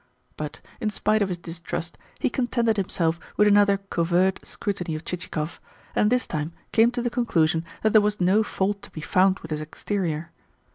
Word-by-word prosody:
But, - - -6 0.2
in 220 - 0
spite 215 +1 +1
of 200 - +2
his 180 - -2
distrust, 170 0 -5 0.2
he - - 0
contented 240 -3 +1
himself 170 -4 0 0.2
with 210 - +6
another 205 -1 +5
covert 185 -1 +1
scrutiny 180 -5 -3
of 155 - -7
Chichikov, 170 -3 -4 0.4
and 210 - +4
this 250 +1 +2
time 155 +1 -3 0.2
came 230 0 +5
to 245 0 -3
the 240 - 0
conclusion 165 -10 +2 0.2
that 220 - +4
there 215 - +8
was 210 0 0
no 190 +4 +4
fault 200 -1 -1
to - - -11
be 155 - -8
found 185 +4 +3
with 160 - -10
his 155 0 -1
exterior). 165 0 -3
190 Hz, 185 wpm, -25 LUFS, 165-210 Hz, 0.4 s, there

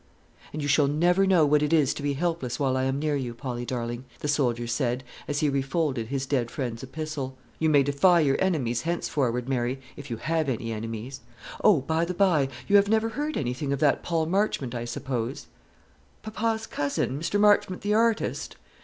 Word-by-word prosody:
"And 150 0 -4
you - - -1
shall 145 0 +4
never 175 +6 +3
know 180 -5 +5
what 150 0 +3
it 150 - 0
is 150 -4 +3
to - - -7
be 145 0 0
helpless 155 -5 -2
while 135 -2 +1
I 130 0 +1
am 135 +1 0
near 150 0 0
you, 125 -4 -3
Polly 120 -1 -5
darling," 120 0 -4 0.2
the - - -2
soldier 125 -5 +1
said, 120 +1 -1 0.2
as 145 0 -1
he 155 - +3
refolded 140 -3 -1
his 135 +1 -2
dead 130 -4 0
friend's 120 -4 -4
epistle. 140 -2 -5 0.2
"You 160 - +2
may 145 -2 +5
defy 165 +5 +4
your 135 -3 +3
enemies 140 -11 +1
henceforward, 130 -7 -1
Mary 130 0 -1 0.2
if 145 0 -10
you 115 - -3
have 160 +3 -1
any 115 -2 -2
enemies. 115 +4 -5 0.4
O, 195 -10 +5
by 160 +4 0
the 180 +1 -3
bye, 170 -8 +3 0.2
you 205 - +6
have 200 0 +3
never 220 +1 +2
heard 295 +6 -3
any 125 -2 -1
thing 140 +2 -3
of 140 - 0
that 145 -2 +3
Paul 165 -2 0
Marchmont, 170 - 0
I 120 -1 -3
suppose?" 125 0 -4 0.8
"Papa's 220 +1 -2
cousin 140 - -2
Mr 185 +6 -1
Marchmont 205 -3 +3
the 205 +1 +1
artist?" 225 0 +1
145 Hz, 200 wpm, -26 LUFS, 130-170 Hz, 0.8 s, you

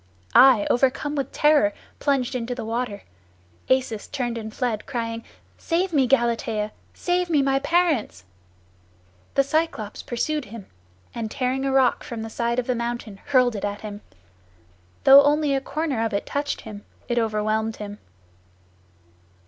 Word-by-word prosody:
I, 255 -5 +7
overcome 265 +3 +1
with 275 -3 -2
terror, 295 -9 +3 0.2
plunged 275 -2 0
into 245 0 -3
the 245 - -5
water. 225 -2 -3 0.7
Acis 255 -5 0
turned 245 -4 -2
and 220 -1 -6
fled, 230 -3 -2
crying, 230 -3 -3 0.4
'Save 350 +2 -1
me, 270 -4 +3
Galatea, 235 -4 +1 0.2
save 355 0 0
me, 295 -4 +3
my 270 0 +2
parents!' 325 - +1 1.1
The 275 - +5
Cyclops 275 -8 -2
pursued 295 +5 -2
him, 215 -1 -10 0.5
and 230 -2 -4
tearing 260 +2 -1
a 270 - +1
rock 265 -2 +3
from 235 -6 -6
the 225 - -7
side 235 +1 -1
of 250 - 0
the 250 - 0
mountain 235 -4 -4
hurled 250 -4 +3
it 200 - -5
at 205 0 -3
him. 210 -1 -7 1.0
Though 275 +1 +10
only 295 0 +2
a 270 - +1
corner 285 -5 -2
of 225 -2 -2
it 200 - -1
touched 285 0 -2
him, 210 -2 -9 0.2
it 240 -1 +1
overwhelmed 220 0 0
him. 205 0 -8
245 Hz, 150 wpm, -24 LUFS, 220-275 Hz, 1.1 s, Though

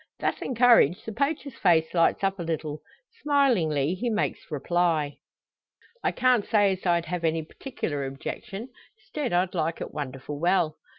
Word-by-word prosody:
Thus - - -1
encouraged, 235 - +4
the 225 - -4
poacher's 280 +1 -1
face 160 -5 +2
lights 170 +2 +2
up 195 0 0
a - - -2
little. 155 -2 -3 0.4
Smilingly, 180 - +2
he 235 +6 -2
makes 215 -2 -2
reply: 160 -1 0 0.9
"I - - +2
can't 250 -3 +3
say 205 -2 +3
as 190 0 -4
I'd 170 -1 +2
have 175 +1 -4
any 160 0 +1
particular 155 - -5
objection. 200 - -6 0.3
'Stead, 240 +5 -4
I'd 180 +1 +1
like 165 -1 -1
it - - -6
wonderful 140 0 -5
well." 170 -2 +1
175 Hz, 155 wpm, -26 LUFS, 155-225 Hz, 0.9 s, encouraged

